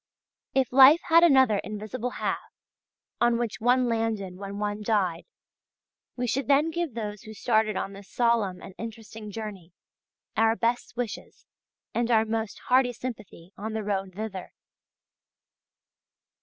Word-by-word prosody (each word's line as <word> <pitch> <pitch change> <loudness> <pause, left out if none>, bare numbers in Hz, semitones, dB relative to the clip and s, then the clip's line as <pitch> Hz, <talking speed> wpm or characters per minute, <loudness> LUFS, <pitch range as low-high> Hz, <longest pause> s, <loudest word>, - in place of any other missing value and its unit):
If 265 -2 +1
life 275 +5 +8
had 335 +1 +7
another 265 -9 +5
invisible 215 +5 -4
half, - - -3 0.6
on 240 -1 +3
which 235 -3 -3
one 250 +2 +3
landed 225 -5 -1
when 200 +1 -7
one 205 0 -2
died, 195 -6 0 0.9
we 250 - -2
should 245 +2 -1
then 290 +3 +3
give 335 -6 -3
those 210 -3 -5
who 220 -2 -11
started 215 -2 +1
on 195 - -3
this 200 0 -12
solemn 230 -6 +1
and 190 - -10
interesting 225 -1 -8
journey 200 -5 -7 0.6
our 225 0 +3
best 235 +1 -1
wishes 240 -4 -5 0.5
and 235 0 0
our 225 -2 +4
most 220 -1 -3
hearty 250 -1 +4
sympathy 215 -7 -8
on 220 +2 -5
the 220 -1 -2
road 195 -2 -2
thither. 205 -3 -6
220 Hz, 140 wpm, -27 LUFS, 205-245 Hz, 0.9 s, life